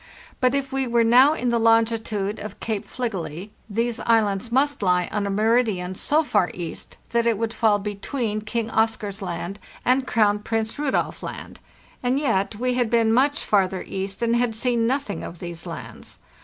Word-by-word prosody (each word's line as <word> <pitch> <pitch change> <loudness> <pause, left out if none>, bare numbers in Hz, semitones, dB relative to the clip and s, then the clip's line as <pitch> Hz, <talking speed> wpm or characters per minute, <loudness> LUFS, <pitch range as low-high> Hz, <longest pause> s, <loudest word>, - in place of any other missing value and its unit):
But 255 +1 +3
if 275 -1 -2
we 270 -1 0
were 235 -1 +3
now 255 +6 +6
in 250 -5 -1
the 235 0 +2
longitude 225 -2 +1
of 210 -1 -8
Cape 220 -3 -3
Fligely 195 -5 -4 0.2
these 230 +2 -1
islands 220 -1 +1
must 280 +2 +2
lie 180 -2 +2
on 205 -1 -1
a - - -2
meridian 210 -3 +1
so 300 +11 +1
far 185 - +2
east 170 -2 -6
that 235 0 +2
it 230 -3 +2
would 225 +1 -2
fall 220 -2 +3
between 210 +2 -3
King 225 +1 -3
Oscar's 220 -2 0
Land 180 +2 -4 0.3
and 255 +1 +2
Crown 210 -2 +3
Prince 225 +3 -2
Rudolf 290 -2 -1
Land; - - -7 0.4
and 255 +2 +1
yet 225 -7 0
we 250 +3 0
had 245 -2 +1
been 230 -1 +3
much 285 +5 +2
farther 190 -2 +1
east 195 +3 -4
and 235 0 +2
had 240 -2 +1
seen 235 0 +1
nothing 265 -4 -1
of 170 - -7
these 170 +1 -7
lands. 125 -9 -8
225 Hz, 180 wpm, -24 LUFS, 200-245 Hz, 0.4 s, now